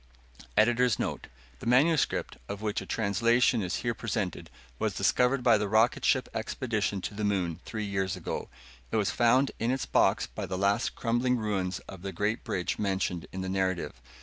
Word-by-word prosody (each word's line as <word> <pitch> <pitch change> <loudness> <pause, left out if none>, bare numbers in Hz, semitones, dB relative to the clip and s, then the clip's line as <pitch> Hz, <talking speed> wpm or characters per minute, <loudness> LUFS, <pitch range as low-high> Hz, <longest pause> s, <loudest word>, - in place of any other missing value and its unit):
[Note: - - -21
Editor's 120 +1 +4
Note: - - -3 0.3
The - - -7
manuscript, 145 +6 +2
of 100 +1 -5
which 105 0 -1
a - - -9
translation 115 +3 +2
is 90 -1 -2
here 120 - +1
presented, 105 -5 -3 0.3
was - - -1
discovered 125 +1 +2
by 115 -4 +5
the 105 - -1
rocket 110 +4 +3
ship 130 -2 +3
expedition 110 -3 -2
to - - -4
the 105 +1 -4
moon 95 -6 0
three 110 -2 -4
years 95 -1 -1
ago. 90 - -5 0.4
It - - -1
was 105 -3 +2
found 125 +5 +3
in 115 - 0
its 130 +1 0
box - - +3
by - - -6
the 95 - -3
last 100 +1 +1
crumbling 120 +2 +1
ruins 95 -5 -2
of 95 - -11
the 95 +1 -4
great 105 +6 -1
bridge 95 -7 -2
mentioned 95 -4 -1
in 95 - -5
the 95 - -3
narrative. 95 -8 -1
105 Hz, 185 wpm, -29 LUFS, 95-120 Hz, 0.4 s, by